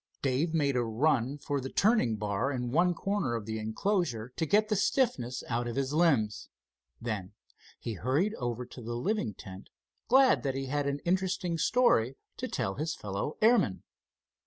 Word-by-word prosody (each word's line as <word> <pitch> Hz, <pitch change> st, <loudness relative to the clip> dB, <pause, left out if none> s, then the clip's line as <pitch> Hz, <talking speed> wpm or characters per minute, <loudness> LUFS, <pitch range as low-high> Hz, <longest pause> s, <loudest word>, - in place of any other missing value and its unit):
Dave 140 Hz, +5 st, +1 dB
made 145 Hz, -4 st, +1 dB
a 125 Hz, -, +2 dB
run 130 Hz, +3 st, +1 dB
for 145 Hz, -1 st, -2 dB
the 135 Hz, -, -5 dB
turning 205 Hz, -, +3 dB
bar 105 Hz, +5 st, -1 dB
in 125 Hz, -3 st, -3 dB
one 175 Hz, +5 st, +3 dB
corner 195 Hz, -11 st, -1 dB
of 115 Hz, -3 st, -4 dB
the 110 Hz, 0 st, -3 dB
enclosure 120 Hz, -, -1 dB
to 160 Hz, -, -1 dB
get 215 Hz, +6 st, +3 dB
the 215 Hz, -, +1 dB
stiffness 185 Hz, -, 0 dB
out 120 Hz, 0 st, -1 dB
of 120 Hz, -, -4 dB
his 135 Hz, +1 st, -1 dB
limbs. 140 Hz, -11 st, +2 dB, 0.5 s
Then 105 Hz, -5 st, -4 dB, 0.5 s
he 115 Hz, -, -4 dB
hurried 135 Hz, -, 0 dB
over 120 Hz, 0 st, -3 dB
to 125 Hz, +1 st, -11 dB
the 120 Hz, +1 st, -4 dB
living 125 Hz, -, -1 dB
tent, 95 Hz, +1 st, -11 dB, 0.4 s
glad 260 Hz, +1 st, +5 dB
that 135 Hz, -2 st, -2 dB
he 135 Hz, 0 st, -2 dB
had 145 Hz, +1 st, -1 dB
an 140 Hz, 0 st, -2 dB
interesting 180 Hz, -1 st, 0 dB
story 135 Hz, -, +3 dB, 0.2 s
to -, -, -3 dB
tell 95 Hz, -, -2 dB
to 120 Hz, -, -11 dB
his 160 Hz, +1 st, -1 dB
fellow 100 Hz, +8 st, -4 dB
airmen. 220 Hz, -, +3 dB
135 Hz, 180 wpm, -30 LUFS, 115-175 Hz, 0.5 s, glad